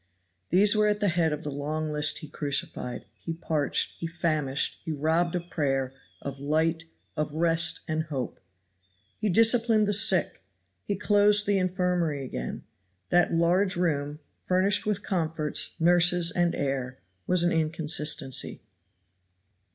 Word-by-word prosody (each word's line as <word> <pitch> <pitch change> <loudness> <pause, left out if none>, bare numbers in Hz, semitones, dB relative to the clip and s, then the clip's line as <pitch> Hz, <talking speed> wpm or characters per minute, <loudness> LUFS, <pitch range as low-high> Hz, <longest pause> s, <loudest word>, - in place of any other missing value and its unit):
These 200 +5 +4
were 210 0 +3
at 210 0 +1
the 205 -2 +2
head 165 -2 +1
of 150 +1 -4
the 150 - -4
long 155 +2 -3
list 150 0 +3
he - - -12
crucified, 140 -4 -4
he 165 +9 -7
parched, 160 -3 -1
he 165 - -3
famished, 155 -5 -1
he 160 - -4
robbed 160 +4 0
of 175 0 -5
prayer, 135 -4 -1 0.3
of 140 -1 -6
light, 160 +3 0 0.3
of 150 0 -3
rest 165 0 +2
and 155 0 -2
hope. 135 -6 -5 0.8
He 215 - -1
disciplined 225 +1 +4
the 205 - +1
sick; 210 +3 +3 0.4
he 205 - -2
closed 205 +1 +3
the 200 -1 +2
infirmary 180 -6 -1
again. 60 - -6 0.5
That 175 -1 +3
large 180 +3 +2
room, 150 -4 -1 0.3
furnished 195 +3 +2
with 205 -1 -1
comforts, 160 -5 -1
nurses 175 0 +4
and 175 -2 0
air, 130 -2 -3 0.3
was 180 -1 +3
an 175 - +2
inconsistency. 150 -5 0
165 Hz, 140 wpm, -27 LUFS, 150-180 Hz, 0.8 s, These